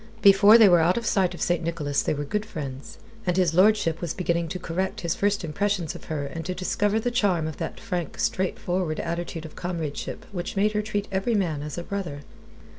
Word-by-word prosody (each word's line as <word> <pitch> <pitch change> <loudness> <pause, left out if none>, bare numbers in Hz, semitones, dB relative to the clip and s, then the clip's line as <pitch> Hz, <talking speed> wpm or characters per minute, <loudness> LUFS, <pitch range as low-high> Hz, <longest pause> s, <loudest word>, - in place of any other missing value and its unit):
Before 200 +3 +8
they 220 -3 +8
were 175 -2 +6
out 170 +5 +3
of 235 - -2
sight 185 -4 +2
of - - -3
St. 175 -1 0
Nicholas 155 -4 -1
they - - 0
were 145 - -3
good 210 +8 -1
friends, 140 -7 -7 0.3
and 180 0 +1
his 180 -4 +3
lordship 185 -3 +3
was 170 -3 -3
beginning 170 -2 0
to 170 - -4
correct 180 +2 -3
his 170 -1 0
first 200 -1 0
impressions 185 +1 -1
of - - -11
her 150 -3 -3
and 165 +4 -6
to 185 - -2
discover 205 +3 0
the 245 +2 -1
charm 195 -9 +1
of 155 - -6
that - - -5
frank, 180 -8 -4
straightforward 180 -3 -1
attitude 170 -1 -4
of 155 - -10
comradeship 165 -5 -4
which 180 0 -4
made 205 +2 +3
her 210 0 0
treat 205 -1 -3
every 195 +5 0
man 165 -8 0
as 150 +1 -6
a 175 - -3
brother. 170 -7 -4
180 Hz, 215 wpm, -25 LUFS, 165-200 Hz, 0.3 s, Before